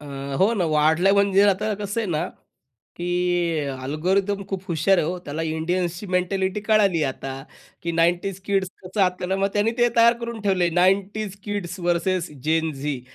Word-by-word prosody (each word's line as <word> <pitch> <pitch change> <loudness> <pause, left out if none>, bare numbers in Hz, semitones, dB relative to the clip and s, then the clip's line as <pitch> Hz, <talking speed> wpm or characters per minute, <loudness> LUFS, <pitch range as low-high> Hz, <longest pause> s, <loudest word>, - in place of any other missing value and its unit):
अ, - - -12 0.4
हो 205 +5 +4
ना, 185 -5 0
वाढल्या 160 +5 +3
म्हणजे 200 0 +4
आता 215 +3 +1
कसं 205 +2 -3
आहे 210 -6 -3
ना, 160 +3 -1 0.7
की 175 -1 0 0.2
अल्गोरिदम 190 +8 0
खूप 190 -2 -4
हुशार 175 +3 +2
आहे 150 - +1
हो. 180 +2 -2
त्याला 150 +3 -4
इंडियन्सची 170 +4 -2
मेंटॅलिटी 190 +2 0
कळाली, 200 -7 +3
आता 135 0 -4 0.5
की 170 - -2
90s 175 +3 +1
किड्स 195 -2 +1 0.2
कसं 190 +3 -3
आता, 180 +1 -1
मग 195 - +1
त्यांनी 205 +2 +2
ते 240 0 +5
तयार 230 0 +7
करून 235 -1 -5
ठेवलंय. 185 -4 +2
90s 200 +2 +1
kids 200 -4 -4
versus 175 0 0
Zen 160 +3 0
Zee. 140 -1 -4
180 Hz, 165 wpm, -23 LUFS, 165-200 Hz, 0.7 s, तयार